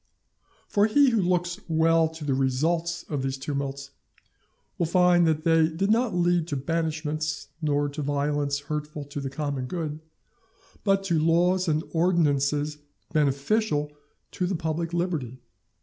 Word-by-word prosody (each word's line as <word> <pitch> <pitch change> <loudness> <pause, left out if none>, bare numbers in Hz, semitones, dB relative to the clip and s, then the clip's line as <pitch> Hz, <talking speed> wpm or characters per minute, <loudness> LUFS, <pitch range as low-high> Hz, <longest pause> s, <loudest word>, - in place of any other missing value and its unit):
For 205 +1 +3
he 275 +4 +4
who 225 -3 +2
looks 180 0 0
well 165 0 +3
to 160 -1 -9
the 140 - +1
results 160 +6 0
of 145 -3 -2
these 135 0 -2
tumults 140 0 -4 0.9
will 170 - +1
find 175 0 +4
that 155 -1 +1
they 165 -1 +4
did 185 +6 -1
not 230 -3 +2
lead 175 -1 +2
to 150 - -3
banishments, 155 0 -2
nor 145 -1 +1
to 145 +2 -5
violence 145 0 -1
hurtful 150 0 -5
to 145 0 -6
the 135 - -3
common 140 -2 -3
good, 155 -1 -4 0.8
but 195 -1 +2
to 170 -5 +1
laws 175 +3 +2
and 155 0 +1
ordinances 150 -3 +1 0.3
beneficial 150 +3 +1 0.4
to 180 - -2
the 190 - -1
public 165 +1 -2
liberty. 165 -8 -2
160 Hz, 145 wpm, -26 LUFS, 145-175 Hz, 0.9 s, he